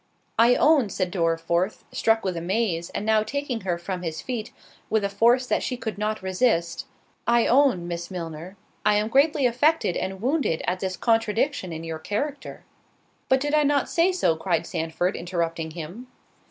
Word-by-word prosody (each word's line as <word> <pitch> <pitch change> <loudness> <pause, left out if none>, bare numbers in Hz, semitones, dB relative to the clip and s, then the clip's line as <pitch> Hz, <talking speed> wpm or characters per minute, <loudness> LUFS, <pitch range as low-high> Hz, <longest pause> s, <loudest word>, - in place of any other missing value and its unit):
"I 235 +2 +6
own," 295 -8 +4
said 185 -2 -2
Dorriforth, 170 +2 0
(struck 225 0 +2
with 185 -2 -2
amaze, 170 0 -1
and 210 - -4
now 220 0 +4
taking 250 +1 -3
her 180 -3 -1
from 180 +1 -5
his 160 -2 -4
feet 235 -4 -4 0.4
with 220 -1 +1
a 200 - 0
force 240 +5 +3
that - - 0
she 250 - -3
could 220 -5 -5
not 215 -1 -2
resist) 185 -4 0 0.4
"I 235 0 +4
own, 245 -10 +3
Miss 170 0 -5
Milner, 170 +1 -7 0.3
I 210 0 +4
am 210 +1 +1
greatly 280 +2 +3
affected 255 - +2
and 190 0 -3
wounded 255 - 0
at 185 +1 -1
this 185 -1 -3
contradiction 225 -1 +1
in 160 0 -6
your 165 -1 -5
character."— 275 - -4 0.7
"But 265 0 +4
did 290 +1 -1 0.2
not 285 -1 +3
I - - -12
say 345 +3 +2
so?" 360 - +1
cried 165 +1 -1
Sandford, 165 +4 -2
interrupting 170 -2 -2
him. 175 +9 -8
205 Hz, 175 wpm, -25 LUFS, 170-245 Hz, 0.7 s, I